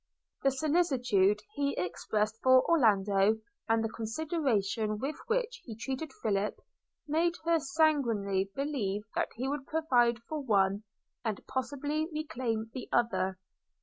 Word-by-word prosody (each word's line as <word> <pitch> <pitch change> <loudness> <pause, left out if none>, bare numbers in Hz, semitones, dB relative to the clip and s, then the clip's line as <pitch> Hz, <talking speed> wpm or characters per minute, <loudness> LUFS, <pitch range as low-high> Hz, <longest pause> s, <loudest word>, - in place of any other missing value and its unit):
The 275 - +4
solicitude 255 - +2
he 280 0 0
expressed 210 +5 -1
for 260 0 +5
Orlando, 210 - +4 0.3
and 225 0 +3
the 225 - -1
consideration 225 - -1
with 275 +7 -3
which - - -1
he 225 - -8
treated 270 +5 -4
Philip, 210 -1 0 0.5
made 335 +3 +2
her 335 -1 +3
sanguinely 240 -11 +1
believe 230 -9 -1
that - - 0
he 250 +4 -2
would 280 0 -3
provide 245 -7 +3
for 310 - -3
one, 200 -4 +2 0.4
and 220 -4 -3
possibly 285 +4 -2
reclaim 240 -8 -3
the 255 - -6
other. 190 -5 +1
245 Hz, 125 wpm, -31 LUFS, 210-295 Hz, 0.5 s, for